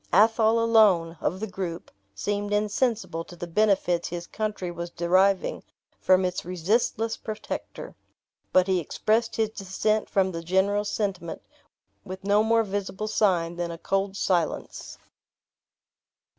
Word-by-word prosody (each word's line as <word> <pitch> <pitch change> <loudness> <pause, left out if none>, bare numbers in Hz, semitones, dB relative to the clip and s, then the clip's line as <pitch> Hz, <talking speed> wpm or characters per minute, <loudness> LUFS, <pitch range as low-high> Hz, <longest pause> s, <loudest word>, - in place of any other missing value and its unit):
Athol 220 +3 +4
alone, 210 -8 +4
of 185 - -1
the 220 - -2
group, 185 -4 -6 0.2
seemed 205 - -2
insensible 210 -4 0
to 175 - -13
the 175 - -6
benefits 180 -2 +1
his 175 0 -5
country 210 -4 -3
was 170 0 -6
deriving 185 +3 +2 0.4
from 185 0 +4
its 180 0 -2
resistless 215 +5 0
protector; 215 -1 -6 0.6
but 185 -1 +5
he 190 -1 +1
expressed 220 +7 0
his 220 -1 0
dissent 215 +2 -1
from 190 -1 +2
the 165 -1 -5
general 190 +4 +1
sentiment 195 -6 -3 0.6
with 190 0 -8
no 205 +1 +3
more 225 +1 +3
visible 200 0 -4
sign 175 -6 +1
than 175 -1 -2
a 170 - -6
cold 195 +3 -1
silence. 175 -6 -2
195 Hz, 130 wpm, -26 LUFS, 175-215 Hz, 0.6 s, but